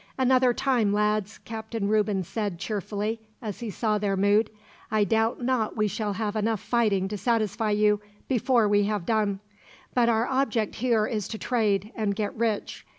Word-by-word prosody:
"Another 255 Hz, -1 st, +4 dB
time, 240 Hz, -5 st, +1 dB
lads," 210 Hz, 0 st, 0 dB
Captain 220 Hz, -2 st, -4 dB
Reuben 210 Hz, -2 st, +1 dB
said 205 Hz, 0 st, -3 dB
cheerfully, 210 Hz, +3 st, -3 dB, 0.2 s
as 215 Hz, -5 st, -6 dB
he 235 Hz, -, -4 dB
saw 210 Hz, +1 st, 0 dB
their 200 Hz, -1 st, 0 dB
mood. 205 Hz, +3 st, +3 dB, 0.4 s
"I 215 Hz, -1 st, +2 dB
doubt 225 Hz, +4 st, +1 dB
not 240 Hz, -4 st, 0 dB
we 215 Hz, 0 st, +2 dB
shall 210 Hz, +1 st, -2 dB
have 210 Hz, +1 st, -2 dB
enough 215 Hz, 0 st, 0 dB
fighting 210 Hz, -5 st, +1 dB
to 210 Hz, 0 st, -4 dB
satisfy 225 Hz, -1 st, 0 dB
you, 210 Hz, 0 st, +3 dB, 0.3 s
before 245 Hz, -3 st, +2 dB
we 205 Hz, 0 st, +3 dB
have 205 Hz, -4 st, -2 dB
done; 210 Hz, -3 st, 0 dB, 0.5 s
but 240 Hz, -2 st, +3 dB
our 225 Hz, 0 st, +2 dB
object 245 Hz, -5 st, 0 dB
here 230 Hz, -3 st, +2 dB
is 215 Hz, -3 st, -2 dB
to 220 Hz, -, -5 dB
trade, 210 Hz, -4 st, 0 dB
and 210 Hz, -3 st, -1 dB
get 210 Hz, -1 st, -2 dB
rich. 225 Hz, -2 st, -2 dB
215 Hz, 170 wpm, -26 LUFS, 205-230 Hz, 0.5 s, Another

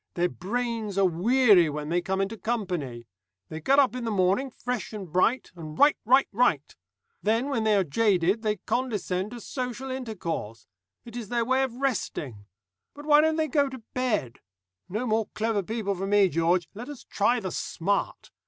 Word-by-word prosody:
Their 175 Hz, +1 st, +1 dB
brains 225 Hz, 0 st, -3 dB
are 195 Hz, -, +4 dB
weary 190 Hz, 0 st, +4 dB
when 150 Hz, 0 st, -5 dB
they 175 Hz, +1 st, +1 dB
come 190 Hz, +2 st, -1 dB
into 195 Hz, +3 st, -2 dB
company. 180 Hz, -, -3 dB, 0.4 s
They 160 Hz, 0 st, -6 dB
get 270 Hz, -, +3 dB
up 270 Hz, -3 st, +4 dB
in 250 Hz, -, -4 dB
the 230 Hz, -, -2 dB
morning 200 Hz, +6 st, +1 dB
fresh 245 Hz, -2 st, -4 dB
and 200 Hz, -3 st, -6 dB
bright, 185 Hz, +9 st, +1 dB
and 155 Hz, -3 st, -8 dB
write, 290 Hz, +1 st, +5 dB
write, 260 Hz, +4 st, +5 dB
write. 195 Hz, -, +1 dB, 0.5 s
Then, 225 Hz, +6 st, +1 dB
when 230 Hz, -6 st, -1 dB
they 215 Hz, -1 st, +4 dB
are 195 Hz, -, +3 dB
jaded, 190 Hz, +3 st, +2 dB
they 215 Hz, -1 st, 0 dB
condescend 210 Hz, -4 st, -2 dB
to 240 Hz, +1 st, -8 dB
social 250 Hz, +2 st, -5 dB
intercourse. 180 Hz, -, -5 dB, 0.4 s
It 235 Hz, -1 st, -11 dB
is 230 Hz, -4 st, -6 dB
their 235 Hz, -1 st, 0 dB
way 260 Hz, +2 st, +2 dB
of 260 Hz, -3 st, -2 dB
resting. 150 Hz, -, -3 dB, 0.5 s
But 290 Hz, +1 st, -10 dB
why 300 Hz, 0 st, +6 dB
don't 315 Hz, 0 st, +2 dB
they 315 Hz, -1 st, 0 dB
go 285 Hz, 0 st, +2 dB
to 260 Hz, -3 st, -10 dB
bed? 215 Hz, -, -1 dB, 0.5 s
No 215 Hz, +7 st, -2 dB
more 220 Hz, -2 st, +1 dB
clever 220 Hz, -1 st, 0 dB
people 210 Hz, 0 st, -2 dB
for 195 Hz, +1 st, -4 dB
me, 200 Hz, -1 st, +4 dB
George. 170 Hz, +2 st, +1 dB
Let 235 Hz, +6 st, -8 dB
us 290 Hz, -4 st, -9 dB
try 240 Hz, +4 st, +1 dB
the 190 Hz, -4 st, -4 dB
smart. 195 Hz, +5 st, -2 dB
215 Hz, 185 wpm, -27 LUFS, 180-250 Hz, 0.5 s, why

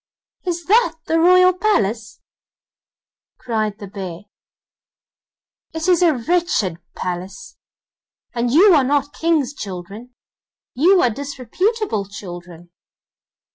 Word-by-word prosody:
'Is 345 Hz, -2 st, -3 dB
that 405 Hz, -5 st, +3 dB
the 325 Hz, -, +1 dB
royal 365 Hz, +2 st, +6 dB
palace?' 230 Hz, -, -1 dB, 1.2 s
cried 215 Hz, -4 st, -2 dB
the 210 Hz, -, -9 dB
bear; 190 Hz, -3 st, -7 dB, 1.5 s
'it 320 Hz, +2 st, -3 dB
is 360 Hz, -2 st, +3 dB
a 335 Hz, -4 st, +4 dB
wretched 240 Hz, -, 0 dB, 0.2 s
palace, 185 Hz, -, -6 dB, 0.8 s
and 240 Hz, 0 st, -1 dB
you 360 Hz, -, +6 dB
are 290 Hz, -4 st, +4 dB
not 285 Hz, +2 st, 0 dB
King's 320 Hz, -5 st, 0 dB
children, 205 Hz, +3 st, -8 dB, 0.6 s
you 360 Hz, +8 st, +4 dB
are 245 Hz, -, +3 dB
disreputable 285 Hz, -, -2 dB
children! 175 Hz, -3 st, -10 dB
260 Hz, 100 wpm, -20 LUFS, -, 1.5 s, royal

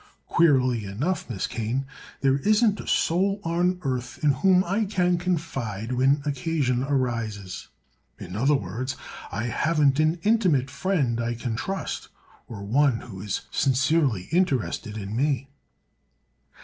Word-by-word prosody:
Queerly 130 Hz, -8 st, +3 dB
enough, 125 Hz, -, -2 dB
Miss 105 Hz, -6 st, -2 dB
Kane, 115 Hz, +4 st, -2 dB, 0.4 s
there 135 Hz, 0 st, +3 dB
isn't 215 Hz, -, +3 dB
a -, -, -8 dB
soul 195 Hz, +4 st, +2 dB
on 175 Hz, +2 st, +1 dB
earth 125 Hz, -2 st, -3 dB
in 150 Hz, -, +5 dB
whom 185 Hz, +7 st, +4 dB
I 200 Hz, +5 st, 0 dB
can 180 Hz, -3 st, +1 dB
confide 135 Hz, -, -3 dB
when 135 Hz, +3 st, +2 dB
occasion 140 Hz, -3 st, 0 dB
arises. 115 Hz, -8 st, -2 dB, 0.5 s
In 90 Hz, -, -8 dB
other 135 Hz, +7 st, +3 dB
words, 130 Hz, 0 st, -3 dB, 0.4 s
I 105 Hz, +5 st, -2 dB
haven't 145 Hz, +3 st, +2 dB
an 155 Hz, +2 st, +2 dB
intimate 180 Hz, -, +2 dB
friend 140 Hz, -7 st, 0 dB
I 120 Hz, 0 st, -1 dB
can 115 Hz, -1 st, -3 dB
trust, 195 Hz, +11 st, -4 dB, 0.4 s
or 100 Hz, -3 st, -8 dB
one 130 Hz, +3 st, +2 dB
who 95 Hz, -6 st, -9 dB
is 105 Hz, -1 st, -2 dB
sincerely 135 Hz, -, +2 dB
interested 135 Hz, -, 0 dB
in 100 Hz, 0 st, -5 dB
me." 135 Hz, 0 st, 0 dB
135 Hz, 135 wpm, -25 LUFS, 120-170 Hz, 0.5 s, in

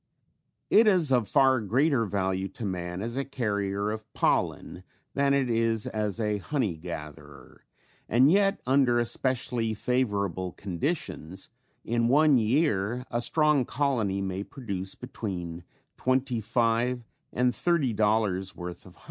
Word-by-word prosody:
It 220 Hz, +1 st, +6 dB
is 180 Hz, -8 st, +3 dB
of 120 Hz, -5 st, +3 dB
far 135 Hz, -2 st, +4 dB
greater 125 Hz, +4 st, +2 dB
value 95 Hz, -1 st, -1 dB
to 100 Hz, +4 st, -7 dB
man 90 Hz, 0 st, -4 dB
as 115 Hz, +2 st, -4 dB
a 135 Hz, -, -1 dB
carrier 100 Hz, -6 st, -2 dB
of 110 Hz, 0 st, -7 dB
pollen -, -, 0 dB, 0.3 s
than 140 Hz, 0 st, +2 dB
it 135 Hz, -2 st, +1 dB
is 115 Hz, -2 st, +1 dB
as 105 Hz, 0 st, -2 dB
a 105 Hz, -2 st, 0 dB
honey 115 Hz, -, -1 dB
gatherer 75 Hz, -4 st, -10 dB, 0.4 s
and 130 Hz, +6 st, +5 dB
yet 195 Hz, +1 st, +3 dB
under 130 Hz, -2 st, +3 dB
especially 120 Hz, -1 st, 0 dB
favorable 100 Hz, -7 st, -1 dB
conditions 95 Hz, -, -4 dB, 0.3 s
in 115 Hz, 0 st, +1 dB
one 145 Hz, +1 st, +5 dB
year 115 Hz, -1 st, +1 dB
a 120 Hz, -, 0 dB
strong 150 Hz, 0 st, +3 dB
colony 115 Hz, -8 st, -1 dB
may 95 Hz, +1 st, -3 dB
produce 100 Hz, -7 st, -6 dB
between 90 Hz, -9 st, -6 dB, 0.3 s
twenty 130 Hz, -2 st, 0 dB
five 120 Hz, +2 st, 0 dB, 0.3 s
and 125 Hz, 0 st, +1 dB
thirty 155 Hz, -8 st, +1 dB
dollars 105 Hz, -3 st, +1 dB
worth 90 Hz, 0 st, -8 dB
of -, -, -16 dB
honey. -, -, -22 dB
115 Hz, 135 wpm, -27 LUFS, 95-130 Hz, 0.4 s, It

